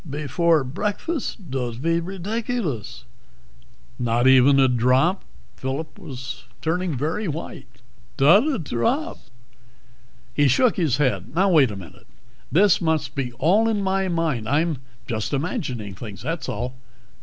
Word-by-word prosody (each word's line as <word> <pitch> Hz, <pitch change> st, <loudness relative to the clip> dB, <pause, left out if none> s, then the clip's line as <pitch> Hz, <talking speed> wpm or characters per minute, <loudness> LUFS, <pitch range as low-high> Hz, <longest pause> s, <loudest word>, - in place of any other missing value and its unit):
"Before 155 Hz, +2 st, +1 dB
breakfast? 205 Hz, -, -4 dB
Dod't 120 Hz, -3 st, -3 dB
be 165 Hz, +4 st, +1 dB
ridiculous." 185 Hz, -, -4 dB, 1.0 s
"Not 120 Hz, 0 st, +1 dB
even 130 Hz, +1 st, +6 dB
a 135 Hz, -, +6 dB
drop?" 130 Hz, +9 st, +2 dB, 0.3 s
Phillip 135 Hz, +4 st, -4 dB
was 130 Hz, -1 st, -8 dB
turning 165 Hz, -2 st, -1 dB
very 165 Hz, -, -2 dB
white. 160 Hz, +1 st, -6 dB, 0.5 s
"Dot 195 Hz, -, +6 dB
a 300 Hz, -, +1 dB
drop." 235 Hz, -, -1 dB, 1.1 s
He 145 Hz, -1 st, +3 dB
shook 230 Hz, -, +3 dB
his 155 Hz, -8 st, +1 dB
head. 145 Hz, +1 st, -1 dB
"Now, 190 Hz, +2 st, +3 dB
wait 145 Hz, -7 st, +5 dB
a 105 Hz, -, -6 dB
minute. 90 Hz, -5 st, -12 dB, 0.4 s
This 195 Hz, +3 st, +4 dB
must 160 Hz, -4 st, 0 dB
be 135 Hz, -4 st, -3 dB
all 195 Hz, -, +3 dB
in 210 Hz, -3 st, 0 dB
my 190 Hz, 0 st, 0 dB
mind. 160 Hz, -10 st, -1 dB
I'm 155 Hz, 0 st, +1 dB, 0.3 s
just 110 Hz, +3 st, -3 dB
imagining 130 Hz, -, -3 dB
things, 105 Hz, 0 st, -9 dB
that's 165 Hz, +4 st, -3 dB
all. 125 Hz, +1 st, -3 dB
150 Hz, 130 wpm, -23 LUFS, 130-185 Hz, 1.1 s, even